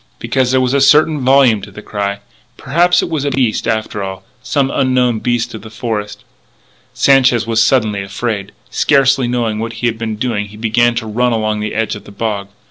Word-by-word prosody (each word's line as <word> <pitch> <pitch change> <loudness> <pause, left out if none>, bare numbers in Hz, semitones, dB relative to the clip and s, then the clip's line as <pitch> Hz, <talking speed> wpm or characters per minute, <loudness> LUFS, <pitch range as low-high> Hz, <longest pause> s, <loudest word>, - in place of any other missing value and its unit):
Because 130 -2 0
there 130 +1 +3
was 130 0 0
a 140 - +2
certain 150 +2 +4
volume 130 -4 +4
to 100 - -9
the 105 +2 -11
cry.... 100 -1 -3 0.4
Perhaps 175 +6 +2
it - - -2
was 155 -4 -1
a 145 - 0
beast, 130 -5 0
after 110 -2 -2
all.... 95 -1 -6 0.2
Some 140 -2 0
unknown 125 -4 +1
beast 120 +1 -1
of 110 - -7
the 110 - -11
forest.... 105 -2 -5 0.7
Sanchez 130 -4 +3
was 115 -1 +1
suddenly 110 -7 +1
afraid. 100 +1 -4 0.2
Scarcely 135 -2 +3
knowing 115 -3 -1
what 115 +1 -4
he 120 +1 -1
was 110 -1 -5
doing 110 -3 -2
he 105 +1 -13
began 120 +2 +2
to 120 -1 -3
run 120 +3 0
along 110 -1 -1
the 105 0 -4
edge 110 -1 -1
of 105 - -11
the - - -12
bog. 100 -1 -3
115 Hz, 200 wpm, -15 LUFS, 105-130 Hz, 0.7 s, certain